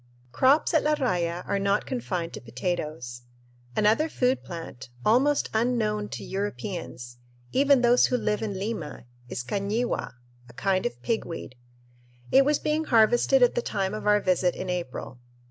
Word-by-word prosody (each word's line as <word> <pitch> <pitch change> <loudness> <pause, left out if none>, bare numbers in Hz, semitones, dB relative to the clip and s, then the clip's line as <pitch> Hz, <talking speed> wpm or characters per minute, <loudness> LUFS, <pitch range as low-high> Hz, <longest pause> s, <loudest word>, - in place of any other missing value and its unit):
Crops 275 - +3
at 315 - +4
La 300 0 +2
Raya 180 - -1
are 200 - 0
not 200 +1 +1
confined 185 -10 -3
to - - -7
potatoes. 125 -1 -4 0.5
Another 220 +10 +3
food 255 -2 +1
plant, 165 -8 -8 0.2
almost 270 +6 +3
unknown 220 -2 0
to - - -6
Europeans, 170 - -5 0.3
even 280 -1 +4
those 245 0 +5
who 250 - +1
live 210 -2 -1
in 205 -3 -3
Lima, 190 - -5 0.2
is 120 - -4
cañihua, 205 - -2 0.4
a - - -14
kind 190 - 0
of - - -9
pigweed. 195 - -3 0.8
It 270 - +7
was 295 0 +3
being 305 +1 -1
harvested 240 +3 +4
at 245 - +4
the 240 - 0
time 195 -4 -2
of 215 0 -4
our 210 0 +5
visit 185 -2 +1
in 185 - -4
April. 170 -7 -5
210 Hz, 155 wpm, -26 LUFS, 175-245 Hz, 0.8 s, It